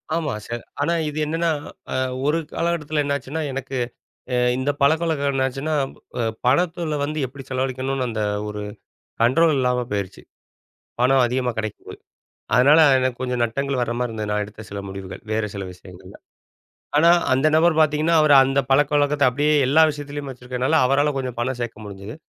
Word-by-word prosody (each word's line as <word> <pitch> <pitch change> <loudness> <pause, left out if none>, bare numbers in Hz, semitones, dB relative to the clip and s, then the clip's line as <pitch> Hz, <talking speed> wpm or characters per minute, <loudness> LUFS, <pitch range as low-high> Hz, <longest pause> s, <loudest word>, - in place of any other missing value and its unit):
ஆமா 155 -4 -1
சார். 120 0 -5 0.2
ஆனா 170 +4 +1 0.2
இது 150 - -8
என்னன்னா 165 +2 0 0.8
ஒரு 155 +2 +2 0.2
காலகட்டத்தில 155 -3 -1
என்னாச்சுன்னா, 140 +2 -3
எனக்கு 135 0 -4 0.8
இந்த 130 +2 -1
பழக்கவழக்கம் 155 -1 +2
என்னாச்சுன்னா, 135 +3 -1 0.7
பணத்தில 160 +3 +1
வந்து 150 +2 -3
எப்படி 135 +1 -9
செலவழிக்கணும்னு 130 0 -2
அந்த 110 -1 -3 0.3
ஒரு 105 0 -5 0.6
கண்ட்ரோல் 155 +7 +4
இல்லாம 125 -1 +1
பேயிருச்சு 100 -2 -4 0.8
பணம் 130 +1 +4
அதிகமா 125 +1 -1
கிடைக்கும் 110 -1 -5
போது. - - -9 0.6
அதனால 145 +6 +6 0.2
எனக்கு 130 -1 -1
கொஞ்சம் 125 -1 -1
நட்டங்கள் 135 +3 -2
வர்ற 120 -1 -2
மாரி 125 0 -1
இருந்தது, 110 -2 -4
நான் 105 0 0
எடுத்த 105 +1 -11
சில 100 0 -5
முடிவுகள் 95 -1 -8
வேறு 110 0 0
சில 100 -1 -4
விஷயங்கள்ல. 90 0 -14 0.8
ஆனா 165 +3 +6 0.2
அந்த 135 +4 +3
நபர் 165 +1 +4
பார்த்தீங்கன்னா 155 +2 +3
அவர் 155 -1 +5
அந்த 135 +1 +1
பழக்கவழக்கத்தை 145 +1 +3
அப்படியே 145 +4 +1
எல்லா 155 +4 +5
விஷயத்திலேயும் 145 -1 -7
வச்சுருக்கதுனால, 125 +3 -2
அவரால 145 +2 +2
கொஞ்சம் 125 -3 -4
பணம் 130 +1 -2
சேர்க்க 110 -2 -6
முடிஞ்சுது. 100 +3 -8
135 Hz, 150 wpm, -22 LUFS, 120-150 Hz, 0.8 s, அதனால